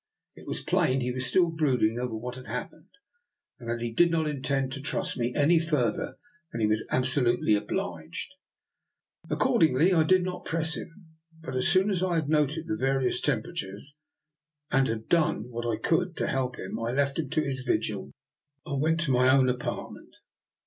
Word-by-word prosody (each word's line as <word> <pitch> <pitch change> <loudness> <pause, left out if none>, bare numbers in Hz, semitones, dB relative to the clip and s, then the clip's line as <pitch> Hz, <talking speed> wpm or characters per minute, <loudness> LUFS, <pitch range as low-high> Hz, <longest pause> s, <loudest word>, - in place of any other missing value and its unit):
It - - -15
was - - -4
plain 130 +1 +2
he 125 0 -1
was 125 +1 -2
still 175 +2 +3
brooding 125 -8 +1
over 125 -2 -3
what 125 +3 -5
had 130 0 -10
happened, - - -6 0.7
and 120 -3 -8
that 120 0 -2
he 120 - -2
did 170 +9 +4
not 165 -1 +1
intend 135 -2 -1
to 135 0 -5
trust 180 +5 -2
me 120 0 -1
any 160 +3 +4
further 150 -9 -1 0.3
than 115 - -5
he 110 - +2
was 110 +1 0
absolutely 125 -3 +2
obliged. 90 - -3 1.0
Accordingly, 165 - +3
I 165 - +5
did 185 +3 +4
not 180 0 -4
press 160 -1 -1
him; 170 +3 -9 0.4
but, 145 - -6
as 130 - +1
soon 190 +3 +3
as 185 -3 0
I 185 -2 +1
had 155 -3 0
noted 155 +1 +1
the 110 - -2
various 135 +1 +1
tem 125 -7 +1
peratures, 145 - -7 0.8
and 135 0 +3
had 110 0 -3
done 160 -6 +1
what 120 0 -3
I 110 - -1
could 175 +1 0
to - - 0
help 130 -2 -1
him, 95 - -5
I 115 +1 -2
left 140 +2 +1
him 160 - -2
to 155 - +1
his 135 -2 -3
vigil 130 - -2 0.5
and 140 -2 -2
went 160 +2 +2
to 160 -5 0
my 125 0 +4
own 130 -1 +5
apartment. 125 -1 -5
135 Hz, 190 wpm, -28 LUFS, 125-165 Hz, 1.0 s, I